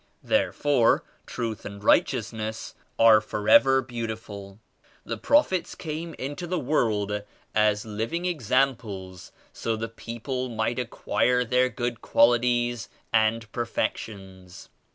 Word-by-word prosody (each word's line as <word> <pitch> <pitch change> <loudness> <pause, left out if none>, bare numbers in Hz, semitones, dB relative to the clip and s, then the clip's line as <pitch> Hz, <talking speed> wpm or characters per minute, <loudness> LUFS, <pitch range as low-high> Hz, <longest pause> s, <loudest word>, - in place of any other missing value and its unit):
There - - +2
fore 140 -6 +2 0.2
Truth 115 -3 -4
and 100 0 -8
Righteousness 110 -1 0 0.2
are 115 -1 +7
forever 135 - +4
beau 120 -2 -4
tiful. 100 -3 -8 0.5
The - - -4
Prophets 285 - +2
came 160 +1 -5
into 145 +7 -5
the 180 +1 -1
world 105 -8 0 0.3
as 105 -1 +2
liv 110 +1 -4
ing 170 +1 -2
examples 115 - -1 0.2
so 115 - -2
the 110 +1 -4
people 120 +3 -5
might 115 +2 -1
acquire 125 0 0
their 125 +1 +2
good 120 -2 -3
qualities 120 0 +2 0.2
and 110 0 +2
perfections. 95 -5 -5
115 Hz, 115 wpm, -26 LUFS, 110-130 Hz, 0.5 s, are